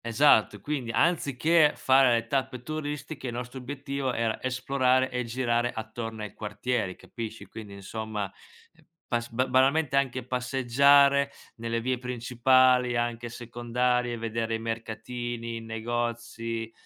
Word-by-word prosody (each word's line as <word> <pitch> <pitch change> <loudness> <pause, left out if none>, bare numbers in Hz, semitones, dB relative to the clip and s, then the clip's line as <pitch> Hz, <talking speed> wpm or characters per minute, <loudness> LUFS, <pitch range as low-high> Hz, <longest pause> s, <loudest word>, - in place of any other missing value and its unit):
Esatto. 115 -3 +4
E 100 - -12
quindi, 135 -2 -3
anziché 155 0 +3
fare 130 -2 +5
le 115 0 +1
tappe 130 -1 -2
turistiche, 150 -1 -5
il 120 - -4
nostro 125 +2 -6
obiettivo 140 0 -3
era 115 -2 -1
esplorare 130 0 +1
e 125 0 -1
girare 120 0 0
attorno 110 0 -6
ai 105 - -7
quartieri, 105 -2 -2
capisci. 110 -2 -8
Quindi 105 -3 -10
insomma 105 0 -5 0.8
pas 120 0 -1
ba 125 +2 0
banalmente 135 +3 +3
anche 130 -3 0
passeggiare 140 +3 +4 0.3
nelle 115 0 -2
vie 125 +1 -1
principali, 125 0 +3
anche 120 0 -2
secondarie, 120 +1 -1
vedere 115 0 -2
i - - -3
mercatini, 115 +1 -4
i - - -7
negozi, 115 0 -3
120 Hz, 130 wpm, -27 LUFS, 115-130 Hz, 0.8 s, fare